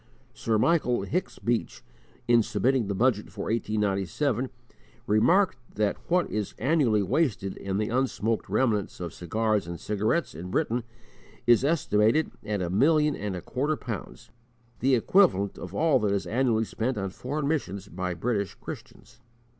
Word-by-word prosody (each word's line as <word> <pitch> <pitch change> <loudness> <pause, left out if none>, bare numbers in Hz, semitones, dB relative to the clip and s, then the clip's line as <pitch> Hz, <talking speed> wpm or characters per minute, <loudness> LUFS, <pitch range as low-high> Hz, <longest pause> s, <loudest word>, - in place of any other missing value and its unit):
Sir 110 -1 0
Michael 125 -4 +2
Hicks 175 - -2
Beach, 120 -1 -2 0.4
in 120 -1 +6
submitting 125 +1 +1
the 100 - -2
Budget 110 -1 +1
for 100 0 -4
1897, 110 - 0 0.6
remarked 125 - +3 0.2
that 105 -1 +1
what 180 +1 +3
is 105 -2 -3
annually 125 -7 +2
wasted 100 - 0
in 95 0 -3
the 105 +1 -1
unsmoked 115 -4 -1
remnants 105 -1 0
of 85 -2 -5
cigars 105 +1 0
and 85 -1 -6
cigarettes 110 - 0
in 85 +4 -7
Britain 120 +6 0 0.6
is 120 +1 +5
estimated 145 -3 +2
at 105 -3 -2
a 85 - -2
million 150 - +3
and 100 -2 -4
a 90 - -6
quarter 145 +4 -1
pounds 110 -6 -7 0.5
the 130 +2 +3
equivalent 115 - +3
of - - -8
all 155 -5 +3
that 105 -3 +1
is 100 - -1
annually 115 -2 +1
spent 120 +4 -2
on 95 -2 -2
foreign 140 +7 -3
missions 100 - -2
by 90 +1 -3
British 100 0 -1
Christians. - - -10
110 Hz, 150 wpm, -27 LUFS, 100-130 Hz, 0.6 s, in